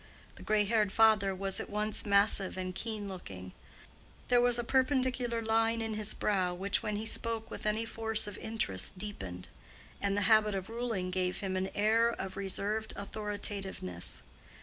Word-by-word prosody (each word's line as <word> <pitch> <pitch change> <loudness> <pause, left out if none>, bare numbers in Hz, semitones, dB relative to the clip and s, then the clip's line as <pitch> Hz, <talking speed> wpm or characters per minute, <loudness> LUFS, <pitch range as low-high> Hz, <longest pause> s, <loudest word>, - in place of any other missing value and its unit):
The - - -14
gray 215 -1 +1
haired 210 -1 +1
father 210 -3 +4
was 195 0 +1
at - - -6
once 210 +1 +1
massive 200 -1 +4
and 185 0 -4
keen 215 0 -5
looking; 95 - -8 0.8
there 245 -1 +5
was 245 0 +5
a 240 - -1
perpendicular 255 -2 0
line 225 +1 +1
in 225 -1 -3
his 215 0 -1
brow 185 -4 0
which 195 +3 -1
when 210 -1 -3
he 215 +2 -4
spoke 225 0 0
with - - -5
any 215 +2 0
force 220 -1 +4
of 205 -2 -5
interest 215 - -1
deepened; 95 - -6 0.5
and 200 0 0
the - - +1
habit 215 0 +4
of 190 +2 -5
ruling 225 -6 -3
gave 180 0 -2
him 190 -2 -3
an 190 +1 -1
air 225 +3 +3
of 190 -5 -5
reserved 200 +3 -2
authoritativeness. 200 - -4
210 Hz, 170 wpm, -31 LUFS, 190-225 Hz, 0.8 s, there